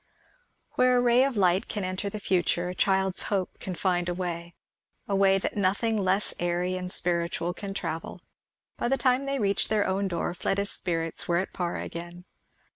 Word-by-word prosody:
Where 255 0 +3
a - - +4
ray 245 +1 +5
of 270 -4 0
light 185 +1 +3
can 205 - -3
enter 185 +2 -2
the 215 - -6
future, 180 -2 +1
a - - -4
child's 190 0 +2
hope 195 -3 -2
can 185 - -5
find 175 -1 0
a 175 - -2
way 170 -1 -4 0.5
a 200 - 0
way 195 0 +5
that 195 - -2
nothing 205 +3 +1
less 195 0 +1
airy 175 +1 0
and 180 0 -2
spiritual 170 0 +1
can 195 +1 -6
travel. 165 -2 -4 0.6
By - - -1
the 270 +2 +2
time 260 +1 +2
they 275 0 0
reached 200 -4 +1
their 215 -2 +2
own 195 +1 0
door 175 -1 -2
Fleda's 200 +3 -1
spirits 165 -2 -2
were 170 - +2
at 185 - -2
par 175 -1 -2
again. 175 +1 -7
185 Hz, 190 wpm, -27 LUFS, 175-205 Hz, 0.6 s, ray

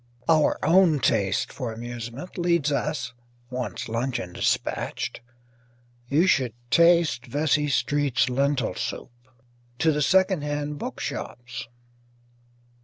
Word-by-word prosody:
Our 155 -2 +4
own 170 -1 +5
taste 95 -6 +1
for 125 -4 -4
amusement 120 +7 -7
leads 170 -4 +1
us 140 -3 -2 0.4
(once 125 0 -4
luncheon 115 -4 -2
dispatched; - - -2 0.9
you 155 +6 +4
should 130 - +2 0.2
taste 170 -5 +4
Vesey 150 0 +1
Street's 145 -2 +1
lentil 135 -1 0
soup) - - -5 0.7
to 160 +4 +3
the 150 0 0
second 190 +2 +3
hand 145 0 -3
bookshops. 120 -1 -5
145 Hz, 105 wpm, -25 LUFS, 125-160 Hz, 0.9 s, own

